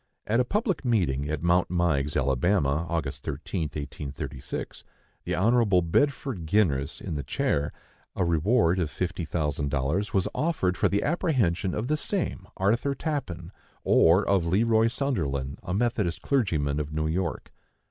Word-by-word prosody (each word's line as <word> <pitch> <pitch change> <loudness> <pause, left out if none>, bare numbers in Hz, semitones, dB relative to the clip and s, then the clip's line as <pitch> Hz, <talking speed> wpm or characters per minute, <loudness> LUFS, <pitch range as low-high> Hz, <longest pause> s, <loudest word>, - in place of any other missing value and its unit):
At 115 +3 +1
a - - +4
public 200 - -1
meeting 75 - +1
at 75 0 -3
Mount 85 +1 +3
Meigs, 80 -5 +1
Alabama, 70 +3 +1
Aug. 85 -2 -1
13, 75 +3 -4
1836, 70 -2 -6 0.4
the - - -1
Hon. 105 -2 +3
Bedford 135 - 0
Ginress 75 -8 +1
in - - -5
the 75 - -2
chair, 70 +2 -1 0.4
a 90 - +1
reward 85 +2 +2
of 85 -4 0
fifty 85 +1 -3
thousand 75 -3 -1
dollars 75 +9 -1
was 95 -2 +1
offered 150 - 0
for - - +2
the 100 - +1
apprehension 125 - +1
of 110 +3 -2
the 155 +2 +1
same 155 - -2
Arthur 115 +8 +1
Tappan, 100 - -4 0.3
or 90 +5 +4
of 100 -3 +3
Le 95 +7 +2
Roy 115 0 +4
Sunderland, 75 - -2
a - - -6
Methodist 105 -4 0
clergyman 80 - +1
of 75 0 -4
New 80 0 -1
York. 80 +1 -2
90 Hz, 150 wpm, -27 LUFS, 75-115 Hz, 0.4 s, a